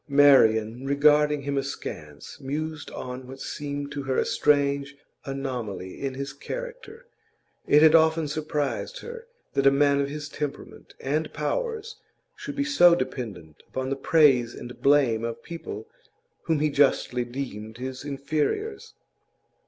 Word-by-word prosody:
Marian, 125 -5 +5
regarding 150 +1 +4
him 140 0 0
askance, - - -7
mused 155 +3 -4
on 125 0 -7
what 135 +1 -10
seemed 145 0 -5
to 145 -1 -4
her 135 -1 -1
a - - +2
strange 140 -1 +1 0.3
anomaly 125 -9 -5
in 135 -1 -3
his 140 +1 -5
character; 485 - -8 0.6
it 150 +1 +6
had 160 -1 +7
often 160 -1 +4
surprised 150 - -3
her 470 0 -9 0.3
that 140 0 +3
a - - +10
man 140 0 +3
of 140 - -1
his 150 0 -5
temperament 145 -1 -7
and 150 +3 -1
powers 450 - -3 0.4
should 285 -9 -7
be 280 - +1
so 175 -13 +6
dependent 115 - -5
upon 130 0 -4
the - - +1
praise 135 -5 +4
and 120 0 -9
blame 135 -6 +4
of 115 0 -4
people 410 - -7 0.6
whom 160 -3 +1
he 155 -1 +2
justly 135 -3 +2
deemed 120 -3 -6
his 130 +1 -6
inferiors. 155 - -2
140 Hz, 140 wpm, -26 LUFS, 130-155 Hz, 0.6 s, a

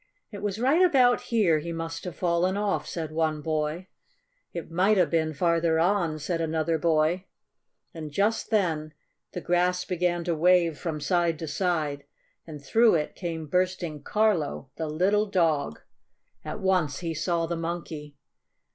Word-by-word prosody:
"It 205 - -8
was 205 -1 -2
right 270 +9 +3
about 260 -9 +4
here 195 -9 +3
he 170 +3 -5
must 165 +1 -5
have 180 -2 -5
fallen 180 +2 +1
off," 205 -1 -1
said 160 -3 -4
one 155 -1 0
boy. 155 +2 -2 0.7
"It 170 -1 -7
might 190 +5 +3
have 180 - +3
been 160 -1 +1
farther 170 0 +2
on," 170 -3 +1
said 165 +3 -2
another 160 0 0
boy. 165 +3 +1 0.7
And 160 -3 -6
just 205 +9 0
then 160 -8 0 0.4
the 180 - -4
grass 180 +1 +1
began 175 -1 0
to 170 - 0
wave 170 -1 +3
from 155 -3 -4
side 170 -1 +1
to 160 - -6
side, 150 -3 -1 0.4
and 150 -3 -9
through 225 - +4
it 150 -2 -1
came 165 -3 -5
bursting 180 -2 -1
Carlo, 170 -8 0
the 160 - -3
little 195 +7 +1
dog! 160 - 0 0.6
At - - -5
once 180 -7 +1
he 165 -2 -2
saw 165 +1 0
the 170 +1 -3
Monkey. 165 -3 -5
170 Hz, 155 wpm, -26 LUFS, 155-185 Hz, 0.7 s, about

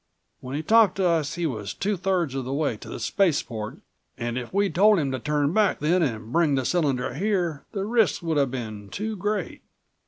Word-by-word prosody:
When 130 +2 -6
he 155 - -2
talked 220 +3 +5
to 195 - 0
us 165 -3 +1
he 175 -1 -2
was 105 -9 -3
two 205 +2 -1
thirds 180 -6 0
of 135 -1 -2
the 130 - -5
way 145 -5 0
to - - -11
the - - -6
spaceport 135 - 0 0.4
and 120 0 -3
if 125 -2 -4
we'd 200 0 +1
told 210 +3 +5
him 140 -5 0
to 130 - -2
turn 150 +2 0
back 210 -2 +3
then 170 +5 +2
and 115 -6 -2
bring 165 -4 +3
the 130 -1 -1
cylinder 140 -8 0
here 175 - -1
the 195 -2 -2
risks 225 -4 +2
would 165 -2 0
have 140 -2 +2
been 110 -5 -6
too 215 - -4
great. 210 +2 -3
155 Hz, 215 wpm, -25 LUFS, 130-195 Hz, 0.4 s, talked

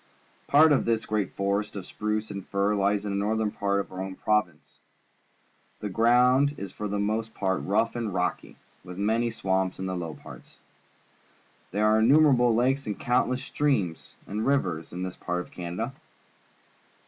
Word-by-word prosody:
Part 155 +2 +6
of 145 - +3
tliis 115 -1 0
great 105 -2 -1
forest 100 +2 -1
of 95 -3 -6
spruce 105 +1 -3
and 100 -1 -6
fir 100 +1 +1
lies 100 0 +1
in 100 - -2
the 100 - -1
northern 110 0 0
part 100 -1 0
of 100 - -5
our 95 0 -5
own 95 0 -5
province. 105 -8 -1 1.0
The 105 - -4
ground 125 +6 +4
is 100 -2 -6
for 105 +2 -5
the 100 0 -2
most 110 +2 -2
part 95 -1 0
rough 115 +4 0
and 115 -3 -2
rocky, 90 -1 -2 0.3
with 90 0 -9
many 110 +4 +1
swamps 95 -4 -1
in 95 - -4
the 95 0 -2
low 85 -3 -5
parts. - - -13 1.1
There 105 +2 0
are 110 +1 +4
in 110 - +4
numerable 130 -5 +5
lakes 130 +3 +1
and 105 - -4
countless 125 +1 +1
streams 105 - -1
and 105 +2 -3
rivers 90 - 0
in 90 +1 -5
this 95 -1 -5
part 90 0 -2
of - - -12
Canada. 90 +8 -4
105 Hz, 175 wpm, -27 LUFS, 95-115 Hz, 1.1 s, Part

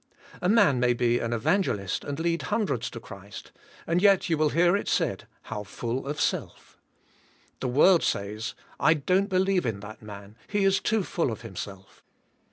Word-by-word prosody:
A 180 - +1
man 200 - +4
may 125 0 +3
be 120 0 +1
an 115 - -2
evangelist 110 - 0
and 145 +1 -5
lead 170 -1 0
hundreds 190 - 0
to 115 - -8
Christ 100 -2 -11 0.3
and 170 +2 +1
yet 195 -3 +4
you - - +4
will 155 -1 +3
hear 175 +4 +3
it 205 - -2
said - - 0 0.2
"How 105 - -5
full 120 +6 -4
of 145 +1 -3
self/' - - -3 0.8
The 130 - -2
world 155 +8 +5
says 105 +3 -2 0.2
"I 160 - +5
don't 185 +7 +1
be 185 - +1
lieve 190 -4 +2
in 105 -3 -2
that 105 +1 -10
man 105 0 -11
he 205 -1 0
is 195 0 +3
too 220 -2 0
full 165 -7 -1
of 110 - -6
himself." 100 -3 -9
135 Hz, 180 wpm, -27 LUFS, 110-180 Hz, 0.8 s, world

